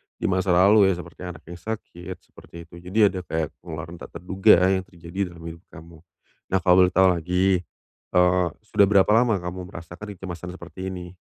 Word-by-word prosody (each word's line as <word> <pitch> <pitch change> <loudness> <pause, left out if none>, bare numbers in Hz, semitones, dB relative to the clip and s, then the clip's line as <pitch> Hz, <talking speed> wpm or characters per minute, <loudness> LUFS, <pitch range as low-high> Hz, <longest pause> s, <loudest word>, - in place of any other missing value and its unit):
di - - -6
masa 95 -1 +1
lalu 100 +3 +6
ya 95 - +3
seperti 85 -1 -11
anak 85 -4 -9
yang 85 - -9
sakit, 95 -3 -7
seperti - - -18
itu. 85 +1 -16
Jadi 90 +5 -3
ada 95 - -4
kayak 80 -2 -2
pengeluaran 85 0 -8
tak - - -12
terduga 95 +3 +4 0.2
yang 95 -1 -1
terjadi 85 +1 -5
dalam 85 - -13
hidup 85 0 -14
kamu, 80 0 -14 0.5
nah 95 - +1
kalau 90 -2 +5
boleh - - -4
tahu 95 0 +6
lagi, 90 +2 +1 0.6
eee, 90 0 +4 0.2
sudah 100 - +3
berapa 100 0 +4
lama 115 0 +4
kamu 90 +1 -6
merasakan 90 +4 -9
kecemasan 90 -1 -7
seperti 95 0 -8
ini? 90 -1 -8
90 Hz, 185 wpm, -24 LUFS, 85-95 Hz, 0.6 s, lalu